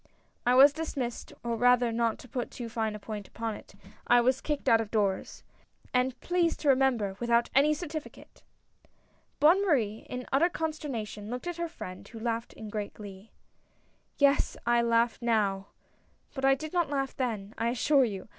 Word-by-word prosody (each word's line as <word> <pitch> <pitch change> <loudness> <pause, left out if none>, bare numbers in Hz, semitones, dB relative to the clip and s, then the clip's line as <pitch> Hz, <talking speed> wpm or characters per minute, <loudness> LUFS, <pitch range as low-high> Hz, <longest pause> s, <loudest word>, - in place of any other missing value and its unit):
I 250 - +5
was 275 +2 +8
dismissed, 280 -6 -4
or 235 -1 -1
rather 245 0 +4
not 230 0 0
to - - -13
put 245 0 -4
too 240 -2 -7
fine 220 -2 -2
a - - -7
point 210 -1 -7
upon 225 -1 -4
it, 200 - -12 0.3
I 245 - +6
was 255 +2 +2
kicked 295 -2 -3
out 225 0 +5
of 220 - -6
doors. 200 -4 -1 0.5
And, 250 0 +1
please 350 -2 +1
to 295 - 0
remember, 255 -7 +2
without 235 0 +2
any 295 +3 +4
certificate! 310 -1 -8 0.5
" - - -39
Bonne 345 +7 +5
Marie, 230 - 0
in 250 0 -5
utter 310 +6 +4
consternation, 275 -11 -4
looked 250 +5 -5
at 350 -1 -4
her 340 0 -3
friend, 185 - -9
who 230 - -10
laughed 230 0 -3
in 220 - -9
great 210 -1 -5
glee. 200 0 -11 0.9
"Yes 280 0 +3
— - - -35
I 235 - +4
laugh 235 0 +1
now, 205 -4 +1 0.7
but 270 -1 -2
I 270 0 +5
did 310 +4 -7
not 345 -5 +1
laugh 275 -2 -2
then, 220 -5 -3
I 230 - +1
assure 270 +3 +3
you! 200 -6 -4
240 Hz, 185 wpm, -29 LUFS, 220-280 Hz, 0.9 s, was